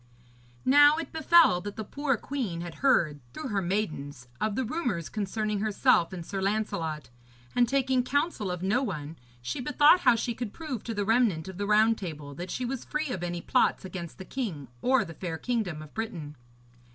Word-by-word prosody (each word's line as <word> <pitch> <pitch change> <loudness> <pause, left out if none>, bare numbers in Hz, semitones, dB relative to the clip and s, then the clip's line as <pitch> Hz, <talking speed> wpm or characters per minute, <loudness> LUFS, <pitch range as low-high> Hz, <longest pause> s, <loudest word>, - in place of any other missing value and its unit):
Now 290 +3 +7
it 325 -2 -5
befell 320 - +5
that 205 +2 -6
the 220 - -4
poor 275 +3 -1
queen 220 -11 -3
had 175 -1 -6
heard, 170 - +3 0.2
through 255 - -5
her 200 -2 0
maidens, 155 - -3
of 215 -1 0
the 260 - 0
rumours 225 - -2
concerning 210 0 -2
herself 215 -3 +3
and 175 -3 -6
Sir 195 +2 -4
Lancelot, 165 - -2 0.4
and, 240 -2 +4
taking 265 -1 +2
counsel 285 - -1
of 180 0 -4
no 215 +7 +2
one, 160 - -4 0.3
she 125 - -3
bethought 295 +5 +5
how 245 - +5
she 235 +1 -1
could 230 -2 -5
prove 295 -9 -5
to 230 - -3
the 205 -1 -1
remnant 220 -8 +2
of 190 0 -8
the 205 - -1
Round 215 +2 +4
Table 150 -6 -6
that 175 +6 -7
she 250 - -3
was 255 0 -3
free 300 0 -2
of 190 -8 -3
any 175 0 -3
plots - - +2
against 175 -3 -7
the 190 - -8
king 175 - -4
or 255 -3 +3
the 165 - -9
fair 165 0 -5
kingdom 195 -9 -2
of 150 - -14
Britain. 175 -10 -5
210 Hz, 195 wpm, -28 LUFS, 175-255 Hz, 0.4 s, Now